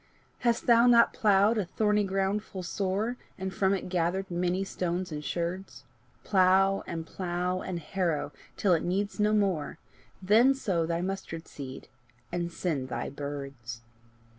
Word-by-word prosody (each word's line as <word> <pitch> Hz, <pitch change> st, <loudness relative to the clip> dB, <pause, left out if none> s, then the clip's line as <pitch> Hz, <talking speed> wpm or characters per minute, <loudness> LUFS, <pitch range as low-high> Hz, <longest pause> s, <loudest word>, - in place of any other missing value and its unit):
Hast 235 Hz, -2 st, +1 dB
thou 235 Hz, 0 st, +6 dB
not 235 Hz, -1 st, +6 dB
ploughed 210 Hz, +1 st, +4 dB
my 210 Hz, -, +2 dB
thorny 210 Hz, +3 st, +1 dB
ground 195 Hz, +1 st, 0 dB
full 190 Hz, -3 st, -8 dB
sore, 200 Hz, +6 st, -1 dB, 0.2 s
And 190 Hz, 0 st, -4 dB
from 195 Hz, 0 st, +2 dB
it 185 Hz, -, -5 dB
gathered 180 Hz, +2 st, -1 dB
many 180 Hz, +2 st, 0 dB
stones 180 Hz, -1 st, -3 dB
and 150 Hz, -1 st, -5 dB
sherds? 170 Hz, -3 st, -4 dB, 0.4 s
Plough, 195 Hz, 0 st, +4 dB, 0.2 s
plough 180 Hz, +1 st, -2 dB
and 185 Hz, -2 st, -4 dB
harrow 170 Hz, -1 st, -1 dB, 0.3 s
till 190 Hz, -3 st, +3 dB
it 165 Hz, -, +2 dB
needs 200 Hz, +4 st, -1 dB
no 210 Hz, 0 st, +3 dB
more 195 Hz, -8 st, 0 dB, 0.4 s
Then 225 Hz, +8 st, +5 dB
sow 180 Hz, -11 st, 0 dB
thy 170 Hz, 0 st, -1 dB
mustard 185 Hz, -3 st, -4 dB
seed, 135 Hz, -2 st, -8 dB, 0.4 s
and 175 Hz, -1 st, -2 dB
send 150 Hz, -7 st, -2 dB
thy 120 Hz, +1 st, -3 dB
birds. 140 Hz, -5 st, -6 dB
185 Hz, 145 wpm, -29 LUFS, 170-200 Hz, 0.4 s, thou